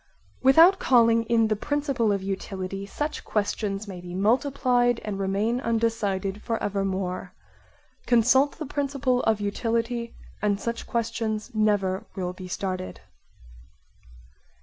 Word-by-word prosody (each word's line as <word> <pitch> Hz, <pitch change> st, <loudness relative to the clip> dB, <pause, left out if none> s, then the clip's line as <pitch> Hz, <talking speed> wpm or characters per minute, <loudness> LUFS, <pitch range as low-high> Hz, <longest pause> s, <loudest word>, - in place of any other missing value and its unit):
Without 325 Hz, +9 st, +7 dB
calling 230 Hz, -2 st, +4 dB
in 225 Hz, -1 st, +3 dB
the 215 Hz, -, +1 dB
principle 275 Hz, -2 st, 0 dB
of 200 Hz, -1 st, -1 dB
utility 195 Hz, 0 st, -4 dB
such 295 Hz, +8 st, -4 dB
questions 205 Hz, -1 st, -2 dB
may 185 Hz, -3 st, -7 dB
be 175 Hz, 0 st, -8 dB
multiplied 245 Hz, +2 st, +2 dB
and 205 Hz, -2 st, -3 dB
remain 205 Hz, +6 st, 0 dB
undecided 210 Hz, -4 st, -1 dB
for 230 Hz, -, -2 dB
evermore; 195 Hz, -3 st, -3 dB, 0.7 s
consult 250 Hz, +4 st, +4 dB
the 315 Hz, -, -5 dB
principle 275 Hz, -3 st, 0 dB
of 220 Hz, -2 st, +2 dB
utility, 230 Hz, +3 st, -2 dB, 0.3 s
and 205 Hz, -1 st, +1 dB
such 235 Hz, +1 st, -4 dB
questions 225 Hz, -2 st, -2 dB
never 205 Hz, -2 st, +1 dB
will 180 Hz, -2 st, -3 dB
be 185 Hz, 0 st, -9 dB
started. 185 Hz, 0 st, -4 dB
220 Hz, 120 wpm, -26 LUFS, 195-245 Hz, 0.7 s, Without